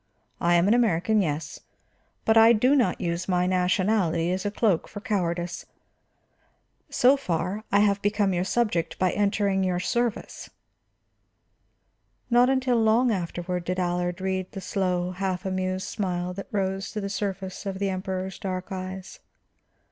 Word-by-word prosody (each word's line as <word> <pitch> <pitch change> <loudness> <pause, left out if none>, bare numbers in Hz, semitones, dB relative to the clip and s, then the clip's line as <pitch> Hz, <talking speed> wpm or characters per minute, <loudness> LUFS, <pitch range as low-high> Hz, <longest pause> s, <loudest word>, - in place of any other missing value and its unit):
I 175 0 +3
am 170 +2 +4
an 210 - +5
American, 215 -3 +2
yes, 150 -3 -3 0.7
but 220 - +4
I 225 +1 +8
do 250 +6 +3
not 240 -10 +2
use 170 0 -2
my 180 -1 +1
nationality 180 -2 +1
as 185 +2 -2
a - - +1
cloak 205 -4 +1
for 205 - -8
cowardice. 175 -5 -2 1.2
So 255 +3 +4
far, 200 - -3
I 200 - +5
have 200 -1 +2
become 205 -1 +1
your 175 0 0
subject 190 -5 0
by 185 -1 +2
entering 200 -1 +1
your 180 -1 0
service." 235 +4 -2 1.8
Not 245 +1 +5
until 260 -3 +2
long 230 +3 +3
afterward 180 -2 -3
did 180 +1 -2
Allard 175 0 -1
read 190 -1 -2
the 195 - -5
slow, 180 -2 -1
half 185 0 -3
amused 185 0 -2
smile 180 -2 -2
that 195 +2 -7
rose 195 -1 -2
to 215 - -3
the 200 - -3
surface 195 -1 -4
of 195 -1 -3
the 195 0 -1
Emperor's 190 0 -4
dark 185 -1 -4
eyes. 185 0 -6
190 Hz, 150 wpm, -26 LUFS, 180-210 Hz, 1.8 s, I